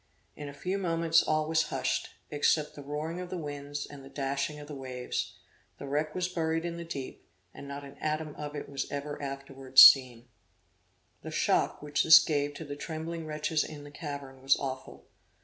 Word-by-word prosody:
In 145 -1 -7
a - - -9
few 185 +6 -2
moments 165 -2 +3
all 155 0 0
was 160 0 +2
hushed, - - -1 0.2
except 150 +1 +2
the 145 - -9
roaring 150 +4 -4
of 180 - -7
the 185 - -4
winds 145 -2 -5
and 140 -2 -11
the 135 - -12
dashing 140 +2 -2
of 145 - -10
the 150 - -8
waves; 130 -2 -4 0.4
the - - -8
wreck 150 +2 -1
was 180 -1 0
buried 165 -2 -1
in 170 0 -4
the 170 - -5
deep, 140 -6 -7 0.3
and 140 - -10
not 140 0 -6
an 140 0 -12
atom 155 0 -2
of 150 0 -7
it 145 - -5
was 140 -1 -4
ever 145 +1 -4
afterwards 135 -1 +5
seen. 125 -3 +7 0.9
The - - -7
shock - - +1
which 150 0 +1
this 160 0 +10
gave 145 -1 +1
to 160 - -7
the 145 -1 -6
trembling 160 +2 -5
wretches 155 +1 0
in 150 -2 -8
the 145 - -11
cavern 140 -4 -7
was 135 +1 +4
awful. 130 -1 -6
145 Hz, 195 wpm, -30 LUFS, 140-160 Hz, 0.9 s, this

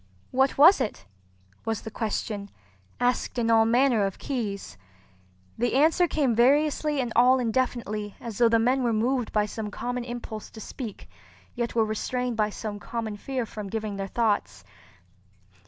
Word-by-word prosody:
"What 265 +1 +2
was 310 +2 +7
it?" 210 - -3 0.6
was 225 -2 -3
the 220 - -7
question, 210 -2 -3 0.5
asked 245 +1 0
in 230 -1 +1
all 225 0 +5
manner 240 -1 +3
of 195 -1 -2
keys. 215 - -4 0.8
The 240 +1 +1
answer 325 +5 +4
came 285 -7 +1
variously 290 +4 +3
and 245 -3 -2
all 250 +2 +6
indefinitely 230 -4 -1
as 225 -4 -7
though 235 -1 +6
the 230 - +4
men 250 +4 +2
were 240 -2 +1
moved 240 +2 0
by 210 -1 +2
some 210 0 -5
common 245 +3 -4
impulse 240 -3 -7
to 220 - -12
speak 220 -1 -7 0.5
yet 235 -1 -3
were 225 -1 +3
restrained 245 +3 -2
by 215 -1 +1
some 210 0 -6
common 225 -1 -4
fear 255 +3 -3
from 210 -2 -7
giving 215 -1 -3
their 195 0 -3
thoughts. 210 - -1
230 Hz, 160 wpm, -26 LUFS, 215-255 Hz, 0.8 s, was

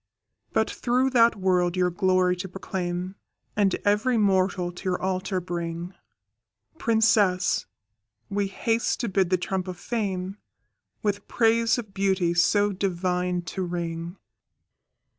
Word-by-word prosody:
But - - +2
through 255 +2 0
that 235 -2 +5
world 180 -2 +1
your 180 -1 +2
glory 185 -1 +2
to 185 +2 -4
proclaim, 180 0 -4 0.4
And 200 -3 +2
every 210 +4 +2
mortal 190 -3 +2
to 175 - -11
your 180 -1 0
altar 185 0 -1
bring, 170 0 -4 0.9
Princess, 215 -5 +2 0.6
we 200 0 -1
haste 225 +4 0
to 235 - -1
bid 190 -2 +1
the 185 - +3
trump 185 +1 -3
of 180 -1 -5
Fame 195 -3 -3 0.7
With 205 -1 -1
praise 230 0 +3
of 215 -5 -6
beauty 190 -3 +1
so 205 +4 +3
divine 180 -2 -1
to 190 - -3
ring. 170 0 -4
190 Hz, 125 wpm, -26 LUFS, 180-205 Hz, 0.9 s, that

